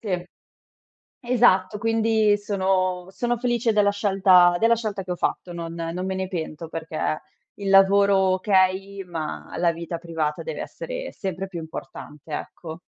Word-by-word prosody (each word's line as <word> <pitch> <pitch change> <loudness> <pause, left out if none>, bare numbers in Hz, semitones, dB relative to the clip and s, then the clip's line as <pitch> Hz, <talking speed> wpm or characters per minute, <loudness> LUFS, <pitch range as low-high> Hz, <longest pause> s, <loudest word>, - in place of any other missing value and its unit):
Sì. 180 -6 -2 1.0
Esatto, 235 -5 +3
quindi 220 -2 +2
sono 190 -3 0
sono 240 +4 -1
felice 240 -1 +1
della 205 -1 +4
scelta 190 -3 +4
della 230 +1 +4
scelta 210 -4 -3
che 185 - -9
ho 175 - -1
fatto. 175 - -2
Non 170 -1 -6
non 170 +2 -4
me 190 - -2
ne 190 0 -3
pento 165 -3 -5
perché 160 -1 -3 0.3
il 200 -1 -4
lavoro 200 +1 +6 0.2
okay, 195 0 +1
ma 165 -4 -6
la 170 -1 +2
vita 170 0 -5
privata 160 -3 -3
deve 485 - -5
essere - - -6
sempre 190 -1 -4
più 175 -3 -7
importante, 155 -1 -9
ecco. 160 +2 -6
190 Hz, 150 wpm, -24 LUFS, 170-205 Hz, 1.0 s, lavoro